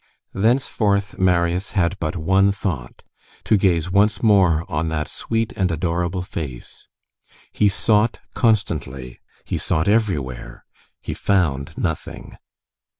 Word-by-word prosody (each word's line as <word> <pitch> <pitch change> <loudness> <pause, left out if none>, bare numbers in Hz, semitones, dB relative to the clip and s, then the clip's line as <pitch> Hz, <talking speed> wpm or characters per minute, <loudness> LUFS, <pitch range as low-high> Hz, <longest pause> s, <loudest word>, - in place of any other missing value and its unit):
Thenceforth, 105 -3 +1
Marius 90 0 +1
had 90 +1 +2
but 80 -2 -2
one 95 +4 +3
thought,—to 90 - -4
gaze 90 -3 +1
once 105 +5 +2
more 90 -7 +4
on 75 +2 -2
that 75 -1 -2
sweet 115 -1 -3
and 95 -2 0
adorable 85 +2 -1
face. 70 -9 -8 0.6
He 105 - +3
sought 105 +2 +2 0.2
constantly, 70 - -1 0.3
he - - -3
sought 80 +3 0
everywhere; 75 - -1 0.4
he - - -4
found 75 -7 0
nothing. 80 -5 -4
90 Hz, 110 wpm, -21 LUFS, 80-100 Hz, 0.6 s, more